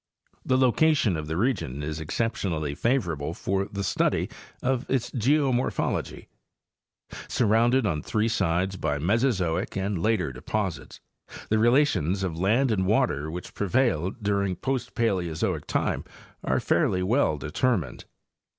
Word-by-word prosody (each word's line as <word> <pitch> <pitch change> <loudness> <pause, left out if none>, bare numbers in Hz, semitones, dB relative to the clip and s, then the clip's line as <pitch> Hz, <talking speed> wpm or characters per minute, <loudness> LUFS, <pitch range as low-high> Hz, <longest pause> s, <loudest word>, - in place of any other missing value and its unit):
The 130 - +2
location 130 - +3
of 80 -1 -4
the 80 +2 -2
region 85 - -1
is 75 +1 -4
exceptionally 80 -4 -2
favorable 85 - -1
for 95 0 -1
the 100 0 -5
study 90 - 0 0.3
of 130 -1 +1
its 130 -3 0
geomorphology. 130 +1 0 1.0
Surrounded 120 +2 +3
on 80 -7 0
three 110 +7 0
sides 95 -3 0
by 75 -4 -1
Mesozoic 95 - 0
and 95 -2 -1
later 100 -8 +1
deposits, 95 +7 -4 0.5
the 110 - +2
relations 115 - +2
of 90 -4 -2
land 110 +9 +2
and 95 -3 +1
water 75 -7 +1
which 90 +2 -7
prevailed 105 - 0
during 100 -2 0
post 130 +7 -3
Paleozoic 90 -9 -1
time - - -1 0.4
are - - +1
fairly 90 0 +1
well 105 - +2
determined. 90 - -1
100 Hz, 125 wpm, -26 LUFS, 85-120 Hz, 1.0 s, location